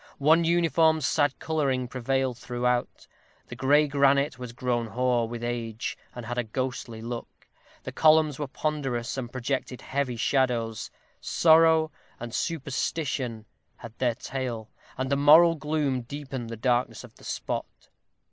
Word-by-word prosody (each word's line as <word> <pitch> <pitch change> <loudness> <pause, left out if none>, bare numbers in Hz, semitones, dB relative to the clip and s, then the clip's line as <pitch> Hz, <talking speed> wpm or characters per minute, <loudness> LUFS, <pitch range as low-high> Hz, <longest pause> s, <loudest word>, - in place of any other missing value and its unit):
One 160 +4 +4
uniform 165 -1 +3
sad 145 0 +1
coloring 135 -5 -1
prevailed 130 0 -1
throughout. 125 0 -2 0.4
The - - -7
gray 145 +3 +4
granite 140 -1 +2
was 125 -2 -6
grown 120 -1 -1
hoar 120 +1 +1
with 120 0 -6
age, 115 -2 -3 0.2
and 120 -1 -7
had 120 +1 -3
a - - +1
ghostly 120 -1 -4
look; 120 0 -7 0.4
the - - -6
columns 155 -2 +4
were 145 - -2
ponderous, 135 -4 -2
and 125 -3 -5
projected 130 0 -3
heavy 135 -2 -2
shadows. 120 -4 0 0.3
Sorrow 160 -1 +4 0.3
and 120 0 -7
superstition 135 -6 -2 0.3
had 115 -1 -11
their 120 -3 +1
tale, 125 -4 -5 0.3
and 130 +1 -1
a - - +4
moral 155 +4 +7
gloom 150 -4 -1
deepened 130 -2 -6
the 115 - -6
darkness 120 +1 0
of - - -13
the - - -18
spot. - - -5
130 Hz, 140 wpm, -27 LUFS, 120-145 Hz, 0.4 s, moral